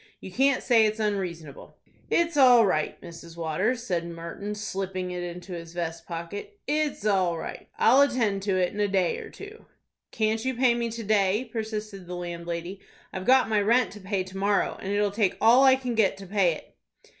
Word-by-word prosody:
You 190 - -9
can't 270 +5 +2
say 230 -4 +5
it's 215 +1 -3
unreasonable." 180 -9 -4 0.3
"It's 335 -1 +1
all 250 -5 +7
right, 155 -6 -1
Mrs. 170 0 -11
Waters," 185 +10 -1
said 175 -8 -1
Martin, 170 +5 -6
slipping 190 -3 -4
it 180 0 -4
into 175 +1 -7
his 165 -1 -8
vest 170 -1 -5
pocket. 180 - -7
"It's 295 -7 -1
all 185 -5 +2
right. - - -7
I'll 260 +5 +5
attend 235 -8 +1
to 195 -1 0
it 180 -1 0
in 205 - -6
a 205 - +2
day 190 -3 0
or - - -9
two." 425 +2 -12 0.4
"Can't 220 0 0
you 260 0 -1
pay 250 0 +3
me 235 0 -2
to 230 0 -6
day?" 205 +2 +2
persisted 215 -4 -5
the 180 - -5
landlady. 170 +1 -5 0.3
"I've 190 0 -5
got 260 +2 +5
my 215 -2 +2
rent 235 +4 +2
to 210 - -11
pay 190 -1 -2
to 190 +1 -10
morrow, 200 +1 +1
and 195 - -4
it'll 205 0 +1
take 205 -2 0
all 240 +4 +6
I 265 -1 +7
can 255 -2 -4
get 210 -4 +2
to 195 - -10
pay 190 -3 +2
it." - - -12
200 Hz, 200 wpm, -26 LUFS, 180-230 Hz, 0.4 s, all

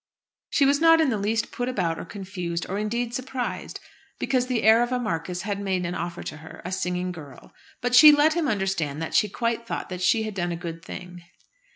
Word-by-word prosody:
She 280 - +3
was 285 +2 +3
not 330 0 +7
in 315 -3 +3
the 220 - 0
least 220 +3 -1
put 245 +1 -3
about 175 -9 -1
or - - -6
confused, 180 -4 -5
or 195 +2 -3
indeed 235 +3 -2
surprised, 255 0 -4 0.4
because 255 -2 0
the 245 -3 -1
heir 220 +2 +6
of 240 +1 0
a 250 - +1
marquis 180 -5 -3
had 200 -1 -3
made 190 -3 -1
an 170 - -3
offer 175 0 -4
to - - -6
her 160 0 -12
a 180 - -4
singing 180 0 -2
girl; 145 -7 -12 0.3
but 245 0 -1
she 300 +4 +10
let 295 +2 +4
him 335 -2 0
understand 190 - -1
that 160 - -5
she 210 - +3
quite 230 +2 -2
thought - - -4
that 180 -1 -6
she 220 +5 +3
had 215 -1 -4
done 175 -2 -2
a - - -2
good 165 -1 -7
thing. 180 -1 -9
205 Hz, 225 wpm, -25 LUFS, 175-245 Hz, 0.4 s, she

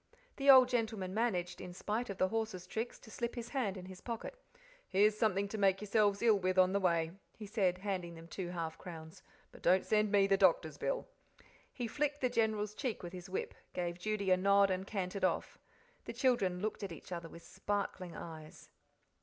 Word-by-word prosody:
The 275 0 +2
old 260 -2 +10
gentleman 220 -6 -1
managed, 195 -6 -1
in 180 - -7
spite 215 +5 -2
of 200 - -5
the 185 - +2
horse's 220 -5 -2
tricks, 225 +5 -4
to 220 - -13
slip 235 +2 -3
his 235 -1 -5
hand 220 -8 -1
in 180 - -8
his 185 0 -10
pocket. 230 - -5 0.5
"Here's 210 +2 +4
something 200 -2 +1
to 215 - -4
make 195 -1 +4
yourselves 210 0 +2
ill 220 -3 +5
with 185 0 0
on 185 0 +5
the 200 - +2
way," 170 -3 +1 0.3
he 215 - -7
said, 195 -4 +1
handing 185 -3 -3
them 165 0 -11
two 180 +1 -5
half 165 -2 -4
crowns; 160 -2 -9 0.3
"but - - -15
don't 185 +2 +4
send 215 -1 +2
me 200 -1 +5
the 195 0 +3
doctor's 345 - +3
bill." - - -2 0.6
He 245 - -4
flicked 290 +4 -1
the 255 - +1
General's 215 -3 +1
cheek 235 -3 -3
with 175 0 -7
his 180 0 -8
whip, 185 - -3 0.2
gave 175 -1 -3
Judy 200 0 -1
a 185 - +6
nod, 200 +1 +4
and 185 +1 -2
cantered 195 -1 -3
off. 185 - 0 0.5
The - - -5
children 230 -8 +1
looked 215 +1 -2
at 200 -3 -4
each 165 +2 -10
other 170 -2 -5
with 170 - -12
sparkling 195 -4 -3
eyes. 155 -2 -10
200 Hz, 205 wpm, -34 LUFS, 180-220 Hz, 0.6 s, old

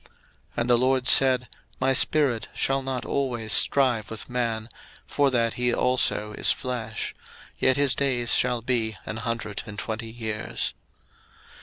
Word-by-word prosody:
01:006:003 - - -26 0.5
And 120 - -2
the 120 - +5
LORD 130 0 +1
said, 130 -2 +6 0.3
My 130 +1 +2
spirit 130 -4 +2
shall 135 0 0
not 130 -2 -4
always 120 -6 -1
strive 125 -6 +3
with 110 +2 -7
man, 115 -3 -2 0.4
for 145 -1 +1
that 115 -3 0
he 125 0 0
also 120 -4 +1
is - - +3
flesh: 115 -4 -4 0.5
yet 130 - +2
his 140 -2 +3
days 125 -3 +1
shall 125 -2 +2
be 115 -4 -1
an 105 - -5
hundred 110 -2 -4
and 105 0 -9
twenty 115 +1 -5
years. 110 -2 -3
120 Hz, 150 wpm, -25 LUFS, 110-130 Hz, 0.5 s, said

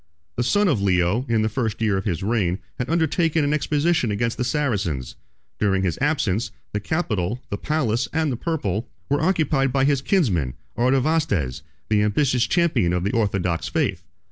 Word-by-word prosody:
The - - -1
son 205 +12 +2
of 140 - +1
Leo, 95 +6 +1
in 110 -2 +2
the - - +2
first 110 -1 -2
year 110 -3 +1
of 95 - -2
his 85 -3 -2
reign, 100 -5 +1 0.2
had 125 - -2
undertaken 165 -1 +2
an 145 +1 +1
expedition 150 -2 +1
against 115 +3 -1
the 125 - -2
Saracens: 100 - -1 0.4
during 95 -2 +2
his 90 -3 -1
absence, 120 - +1 0.2
the 105 - 0
capital, 110 - -1
the 100 - -1
palace, 130 -6 0
and 160 -2 0
the - - -1
purple, 115 - -2 0.2
were 145 - +2
occupied 155 -6 +2
by 135 +1 +2
his 140 -2 +2
kinsman 100 - +1 0.2
Artavasdes, 130 - +1 0.3
the 105 -1 +3
ambitious 125 +4 +2
champion 130 - +2
of 90 0 0
the 100 - 0
orthodox 95 -6 0
faith. 115 - -1
120 Hz, 170 wpm, -23 LUFS, 100-150 Hz, 0.4 s, the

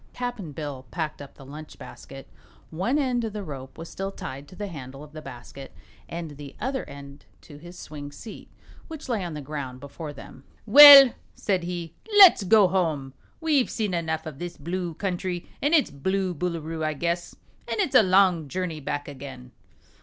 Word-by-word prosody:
Cap'n 245 -10 -5
Bill 140 -3 -7
packed 155 -4 -4
up 140 - -12
the 135 - -14
lunch 150 +3 -11
basket. 135 0 -11 0.4
One 190 - 0
end 255 -4 0
of 220 -2 -4
the 210 -1 -5
rope 135 -5 -9
was 165 +1 -8
still 195 +3 -5
tied 140 -6 -8
to 185 - -14
the 205 - -5
handle 135 -6 -9
of 150 - -14
the 155 0 -9
basket 135 0 -11 0.3
and 165 -2 -6
the 145 -1 -10
other 265 0 -2
end 140 0 -12 0.2
to 145 - -14
his 175 +3 -12
swing 145 -3 -9
seat, 210 +10 -11 0.4
which 315 -3 -9
lay 230 -6 -1
on 170 -3 -5
the 150 - -6
ground 135 -3 -6
before 140 +3 -8
them. 135 -2 -13 0.2
"Well," 275 +2 +11 0.2
said 185 -4 -1
he, 170 -2 -5 0.2
"let's 385 - +9
go 200 +1 +5
home. 160 -8 -1 0.3
We've 300 -6 +2
seen 210 -5 -2
enough 160 -2 -2
of 150 -3 -8
this 175 0 -6
Blue 170 +2 -4
Country 180 -1 -3
and 295 +4 +3
its 300 - +2
Blue 190 +6 -1
Boolooroo, 165 -1 -4
I 155 0 0
guess, 170 +3 -3 0.3
an' - - -3
it's 370 -9 0
a - - +8
long 185 -5 +3
journey 175 0 -4
back 145 0 -4
again." 135 - -10
170 Hz, 185 wpm, -25 LUFS, 145-195 Hz, 0.4 s, Well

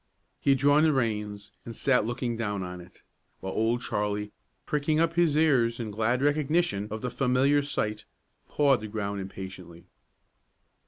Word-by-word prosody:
He - - -1
had 135 - +5
drawn 145 +3 +4
the 155 -1 +4
reins 105 -5 -2
and 115 - -8
sat 125 -4 +2
looking 120 0 -2
down 105 -4 -2
on 90 0 -7
it, 90 +1 -17 0.4
while 95 - -5
Old 115 +2 0
Charlie, 105 0 -2 0.3
pricking 150 +1 0
up 165 0 +2
his 170 -3 +2
ears 130 -7 +3
in 110 -3 -4
glad 115 +5 0
recognition 145 - +1
of 110 0 -5
the 125 - -2
familiar 135 +3 +2
sight, 110 -7 -3 0.4
pawed 140 -3 +3
the 110 - -5
ground 100 -2 -3
impatiently. 95 -3 -9
115 Hz, 160 wpm, -27 LUFS, 105-140 Hz, 0.4 s, had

